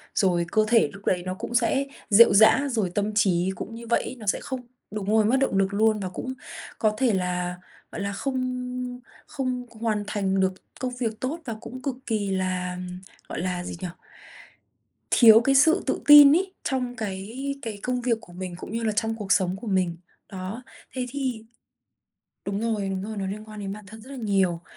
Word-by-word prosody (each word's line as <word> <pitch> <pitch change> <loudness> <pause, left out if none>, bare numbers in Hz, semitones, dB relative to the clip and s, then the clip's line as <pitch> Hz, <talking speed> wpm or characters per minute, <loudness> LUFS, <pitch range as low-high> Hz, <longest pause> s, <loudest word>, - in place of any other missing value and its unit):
rồi 180 -4 +2
cơ 215 0 +3
thể 230 -1 +4
lúc 200 0 -13
đấy 180 -1 +1
nó 185 - -2
cũng 225 +5 -6
sẽ 270 +2 +2 0.2
rệu 220 +3 +8
rã, 220 +7 +6
rồi 220 -6 0
tâm 205 +1 0
trí 185 -3 +2
cũng 225 +5 -7
như 235 0 -9
vậy 235 - +2
ấy, - - -6
nó 215 - -9
sẽ - - +2
không 260 -3 -5 0.3
đúng 205 -2 -4
rồi, 220 0 +4
mất 240 +5 +3
động 265 -8 +1
lực 195 0 +1
luôn 215 +1 +3
và 190 -2 -3
cũng 260 +7 -5 0.5
có 215 -1 +2
thể 250 -3 +2
là, 180 -1 -1 0.4
gọi - - -5
là, 200 0 -2
không 250 +1 -3 0.3
không 255 -3 -3
hoàn 220 -2 -2
thành 195 -2 0
được 190 0 +2 0.3
công 250 -1 -3
việc 225 -3 -2
tốt 280 +6 -3
và 230 -4 -4
cũng 255 +1 -8
cực 275 -2 -2
kỳ 210 -4 -1
là, 185 -1 -1 0.5
gọi - - -4
là, 180 -1 -2
gì - - -6
nhỉ? 185 - -2 1.2
thiếu 225 -2 +8
cái 270 +2 +2
sự 320 +5 +5
tự - - 0
tin 290 -1 +10
ấy, 375 +2 0
trong 250 -2 -2
cái 205 -1 -5 0.3
cái 220 -5 -6
công 250 0 -1
việc 235 -2 +1
của 175 - -15
mình 180 0 -6
cũng 180 - -8
như 230 +1 -2
là 220 - +1
trong 225 +1 -1
cuộc 205 -3 -4
sống 185 -1 +3
của 235 - -7
mình. 185 -4 0 0.3
Đó, 190 +5 -6 0.3
thế 255 -1 -1
thì 255 -4 -3 1.0
đúng 200 +1 -2
rồi, 215 -4 -1
đúng 190 -1 -2
rồi, 215 +1 -5
nó 195 - -2
liên 205 +2 -5
quan 215 -1 -8
đến 195 -1 -4
bản 210 0 -10
thân 220 +3 -11
rất 250 - -14
là 275 - -7
nhiều. 195 -7 +1
215 Hz, 210 wpm, -25 LUFS, 190-250 Hz, 1.2 s, tin